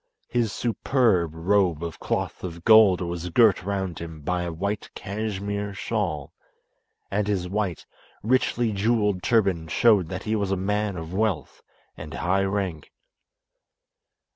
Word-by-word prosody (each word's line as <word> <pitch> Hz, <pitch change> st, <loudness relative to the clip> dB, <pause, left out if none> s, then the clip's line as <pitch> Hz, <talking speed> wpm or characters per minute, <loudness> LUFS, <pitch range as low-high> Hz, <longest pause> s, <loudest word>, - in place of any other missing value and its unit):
His 120 Hz, -4 st, 0 dB
superb 110 Hz, -, +1 dB
robe 90 Hz, -1 st, +1 dB
of 85 Hz, -1 st, -6 dB
cloth -, -, -3 dB
of 85 Hz, -2 st, -6 dB
gold 110 Hz, -5 st, +7 dB
was 85 Hz, 0 st, -4 dB
girt 110 Hz, +3 st, +4 dB
round 95 Hz, -2 st, -3 dB
him 80 Hz, -2 st, -8 dB
by 90 Hz, +4 st, -1 dB
a 85 Hz, -1 st, -3 dB
white 100 Hz, +5 st, -3 dB
cashmere 100 Hz, 0 st, -4 dB
shawl, 85 Hz, -11 st, -2 dB, 0.8 s
and 105 Hz, 0 st, 0 dB
his 95 Hz, -4 st, -1 dB
white, 95 Hz, -3 st, -2 dB, 0.4 s
richly 120 Hz, -1 st, +1 dB
jewelled 105 Hz, -2 st, +1 dB
turban 95 Hz, -8 st, +1 dB
showed 105 Hz, -1 st, +4 dB
that 95 Hz, -, -5 dB
he 110 Hz, 0 st, -1 dB
was 100 Hz, -2 st, -1 dB
a 95 Hz, -, 0 dB
man 105 Hz, +1 st, -1 dB
of 80 Hz, +1 st, -7 dB
wealth 95 Hz, -9 st, -1 dB, 0.3 s
and -, -, -8 dB
high 95 Hz, +4 st, +1 dB
rank. 95 Hz, -6 st, -3 dB
95 Hz, 140 wpm, -25 LUFS, 85-105 Hz, 0.8 s, gold